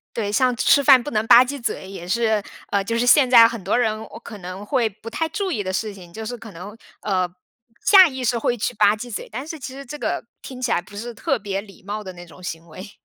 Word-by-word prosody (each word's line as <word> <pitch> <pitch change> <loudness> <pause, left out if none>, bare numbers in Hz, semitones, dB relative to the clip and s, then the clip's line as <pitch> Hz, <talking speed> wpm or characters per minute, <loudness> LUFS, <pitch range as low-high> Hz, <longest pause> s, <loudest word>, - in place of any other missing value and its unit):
对， 215 -3 -2
像 250 +3 +2
吃 280 +5 +4
饭 265 -2 +7
不 245 - -6
能 215 0 0
吧 235 +2 +8
唧 280 +1 -6
嘴 190 -4 -4
也 190 -3 -8
是， 220 0 +1 0.3
呃， 200 -1 +1
就 230 +4 -2
是 245 - +1
现 260 0 +6
在 230 -2 +8
很 230 -4 -7
多 195 +6 +1
人 220 -3 +1
我 - - -10
可 225 -3 -10
能 185 +2 -8
会 240 -1 +1
不 215 +2 -11
太 325 +8 -2
注 400 +2 -3
意 210 - -2
的 185 - -3
事 210 +2 -3
情， 180 -3 -14
就 220 +5 -7
是 245 +3 -4
可 220 -1 -11
能 200 +5 -10 0.2
呃， 185 -3 0 0.6
下 380 -3 +8
意 260 -2 -6
识 240 0 +1
会 240 +1 -1
吃 215 - -2
吧 205 0 +4
唧 240 +3 -8
嘴， - - -6
但 255 +6 -6
是 320 - -6
其 265 -2 -8
实 275 +1 -9
这 295 +4 -8
个 - - -3 0.2
听 255 -1 -9
起 250 - -1
来 175 - +2
不 205 +3 -13
是 235 +3 -6
特 245 +3 -1
别 200 -1 -3
礼 200 -2 -16
貌 210 +2 -5
的 190 - -7
那 175 0 -11
种 175 +2 -16
行 165 -1 -6
为。 185 +6 -10
220 Hz, 290 characters per minute, -22 LUFS, 195-250 Hz, 0.6 s, 吧